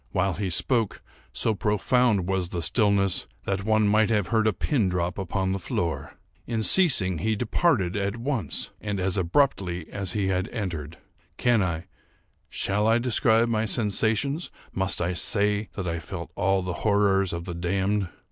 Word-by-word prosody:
While 95 0 +1
he 95 +2 -3
spoke, 115 +4 0 0.3
so 110 - 0
profound 105 0 +1
was 95 -2 -1
the 85 -2 -4
stillness 100 - +2 0.2
that 100 0 -2
one 110 0 +2
might 110 +1 +3
have 105 -6 0
heard 110 -1 +2
a - - +4
pin 110 -1 0
drop 90 +1 -2
upon 95 0 -1
the 95 - -2
floor. 80 -5 -3 0.3
In 115 -2 -1
ceasing, 105 - +4
he 110 +4 0
departed 105 - +1
at 100 +2 -2
once, 120 -2 -3
and 105 -2 -3
as 95 0 0
abruptly 90 - 0
as 95 -2 -2
he 100 -2 0
had 90 -1 -1
entered. 85 - -5 0.4
Can 120 -3 +3
I—shall 95 +3 -4
I 115 +1 +4
describe 120 -1 +2
my 110 -1 0
sensations? 115 - +1 0.2
Must 95 -2 +1
I 90 +2 -1
say 105 +3 +2
that 95 -2 -4
I 85 0 -2
felt 85 +1 -7
all 95 0 +1
the 90 -1 -3
horrors 100 -3 +2
of 85 0 -5
the 90 - -5
damned? 95 +3 -1
100 Hz, 165 wpm, -25 LUFS, 90-110 Hz, 0.4 s, a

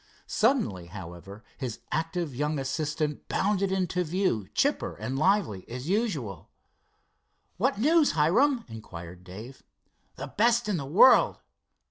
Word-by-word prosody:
Suddenly, 215 - +1
however, 95 +3 -10 0.2
his 125 -5 -4
active 165 -1 -2
young 150 +4 -1
assistant 150 +2 -2
bounded 195 -1 +1
into 180 -1 0
view, 165 - -1
chipper - - +1
and 110 +7 -4
lively 155 - +1
as 125 +6 -6
usual. 160 - -2 1.1
"What 265 +6 +1
news, 305 +6 +4
Hiram?" 230 - +3
inquired 90 -6 -10
Dave. 110 +8 -10 0.5
"The 135 - -6
best 235 - +2
in 205 -4 0
the 140 -3 -5
world." 190 - +6
150 Hz, 120 wpm, -28 LUFS, -, 1.1 s, world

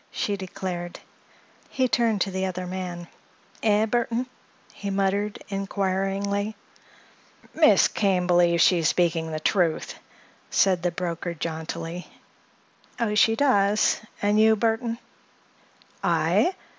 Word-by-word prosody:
she 205 - -2
declared. 180 -2 -6 0.7
He 260 -1 +1
turned 230 -4 +1
to 195 - 0
the 190 0 -1
other 185 0 -4
man. 180 -1 -5 0.5
"Eh, 215 0 +3
Burthon?" 235 +2 -1 0.5
he 200 - -6
muttered, 200 +1 0
inquiringly. 195 +1 -2 1.0
"Miss - - +5
Kane 190 -4 0
believes 175 -1 +4
she 180 - +4
is 160 - +1
speaking 165 -2 0
the 155 - -3
truth," 170 -1 0 0.6
said 185 -3 +2
the 175 - +1
broker 170 0 -4
jauntily. 165 +2 -5 0.9
"Oh, 230 -3 0
she 225 +1 +4
does. 210 -6 +2 0.2
And 205 +1 +3
you, 220 0 +5
Burthon?" 230 +1 -1 1.1
"I? 370 - +2
195 Hz, 115 wpm, -25 LUFS, 175-210 Hz, 1.1 s, Miss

